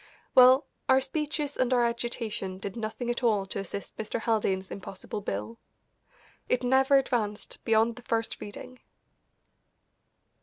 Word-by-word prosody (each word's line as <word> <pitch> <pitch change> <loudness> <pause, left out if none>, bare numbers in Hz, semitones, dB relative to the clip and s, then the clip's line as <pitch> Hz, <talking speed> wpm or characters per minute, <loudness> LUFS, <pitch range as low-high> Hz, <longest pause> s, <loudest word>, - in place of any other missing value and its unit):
Well, 255 +2 +7 0.2
our 260 0 +7
speeches 290 +1 -3
and 255 -1 +1
our 245 -2 +4
agitation 235 -5 -3
did 195 0 -6
nothing 235 +2 -3
at 240 - -3
all 215 -5 +2
to 195 - -5
assist 195 +1 -6
Mr. 220 +1 -3
Haldane's 200 -4 0
impossible 195 +2 -6
bill. 105 - -4 0.9
It 250 0 +1
never 265 +2 +5
advanced 220 -6 -2
beyond 225 +1 +3
the - - -9
first 230 -1 -2
reading. 245 +5 -9
230 Hz, 130 wpm, -28 LUFS, 205-255 Hz, 0.9 s, Well